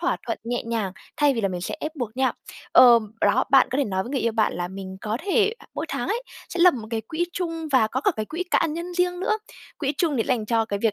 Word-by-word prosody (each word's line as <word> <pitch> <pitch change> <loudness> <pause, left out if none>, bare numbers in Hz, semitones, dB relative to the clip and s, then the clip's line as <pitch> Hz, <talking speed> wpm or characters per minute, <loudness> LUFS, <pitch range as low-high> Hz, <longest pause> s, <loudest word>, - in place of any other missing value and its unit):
thỏa 355 - +1
thuận 230 - -2
nhẹ 240 +1 -2
nhàng, 225 -5 -2 0.2
thay 290 -2 +3
vì 230 - -1
là 195 - +1
mình 180 -1 -4
sẽ 180 - -4
ép 310 +1 -5
buộc 240 -3 -4
nhau. 260 0 +2 0.4
Ờm, 235 -4 +7
đó, 215 +6 +3
bạn 270 -1 +7
có 260 - -1
thể 285 - +3
nói 190 -4 -1
với 235 - -8
người 275 -2 -1
yêu 230 - 0
bạn 220 -1 +2
là 175 0 -3
mình 190 0 -7
có 215 +1 -2
thể 415 +1 +3 0.2
mỗi - - -3
tháng - - -3
ấy 475 +3 -1 0.3
sẽ 350 - -3
lập 360 0 +7
một 225 -4 -6
cái 225 -1 -1
quỹ 315 +10 -2
chung 330 -3 -3
và 255 -5 +5
có 255 +4 -2
cả - - +5
cái 215 - -2
quỹ 335 +8 -4
cá, - - +3
nhân 340 +3 -5
riêng 360 0 0
nữa. 430 +2 +1 0.4
Quỹ 280 -2 0
chung 320 -6 +1
thì 230 - +2
sẽ - - -10
dành 230 -4 0
cho 225 0 +2
cái 200 -2 -3
việc 225 -3 +3
250 Hz, 285 wpm, -24 LUFS, 220-330 Hz, 0.4 s, Ờm